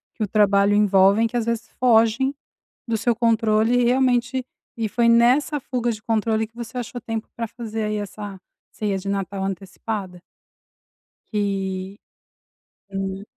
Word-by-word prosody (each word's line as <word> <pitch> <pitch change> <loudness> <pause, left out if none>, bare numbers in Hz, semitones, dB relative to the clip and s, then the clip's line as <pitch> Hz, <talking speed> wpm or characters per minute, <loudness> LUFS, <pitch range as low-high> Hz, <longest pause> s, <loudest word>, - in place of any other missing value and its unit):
que 220 - -2
o - - -1
trabalho 200 0 +3
envolvem 200 +1 +4
que 240 +2 -3
às 230 - -1
vezes 230 -1 -2
fogem 240 +2 +4 0.5
do 225 -1 0
seu 235 +2 +1
controle 225 0 +2
e - - +3
realmente, 255 0 +2 0.3
e 225 -2 -1
foi 235 +2 +2
nessa 255 +6 +4
fuga 245 -3 -2
de 215 - -6
controle 220 0 0
que 230 - -38
você 235 +1 -7
achou 245 0 -5
tempo 225 -1 -4
pra 230 -1 -3
fazer 225 -1 -5
aí 210 0 -1
essa 205 -1 -6 0.3
ceia 205 -2 -2
de 195 +1 -5
Natal 195 0 -2
antecipada. 190 0 -5 1.1
Que, 195 -1 -2 0.9
hum. 195 0 -4
220 Hz, 150 wpm, -23 LUFS, 200-235 Hz, 1.1 s, envolvem